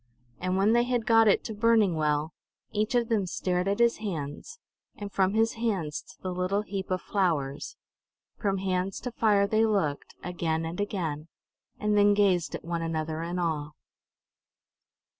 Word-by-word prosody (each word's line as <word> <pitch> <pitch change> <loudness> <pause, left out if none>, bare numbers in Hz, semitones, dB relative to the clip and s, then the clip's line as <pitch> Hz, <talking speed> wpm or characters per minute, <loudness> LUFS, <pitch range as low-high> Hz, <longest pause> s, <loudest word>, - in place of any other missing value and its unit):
And 185 +1 -1
when 205 +3 +4
they 240 0 +4
had 245 -2 0
got 225 0 +5
it 205 - +4
to 220 - -5
burning 215 -4 +3
well, 150 0 0 0.4
each 215 +4 0
of 240 -1 +2
them 215 -5 +1
stared 180 +1 -1
at 200 +1 +1
his 235 0 +3
hands, 180 - -5 0.4
and 205 -1 -7
from 195 +1 +1
his 225 +1 +3
hands 195 -10 -2
to - - -18
the 185 -1 -2
little 185 +3 0
heap 195 -2 -5
of 185 -1 -1
"flowers"; 155 -8 -1 0.6
from 200 -3 -1
hands 185 0 -1
to 250 - -4
fire 210 -4 +3
they 215 +2 +2
looked, 195 -10 0
again 165 -2 -2
and 165 +3 -5
again; 165 -7 -3 0.5
and 210 0 +1
then 205 0 +5
gazed 190 -5 +2
at - - -8
one 170 0 -2
another 160 -1 -2
in 170 +2 -3
awe. 155 -4 -2
190 Hz, 170 wpm, -28 LUFS, 165-215 Hz, 0.6 s, got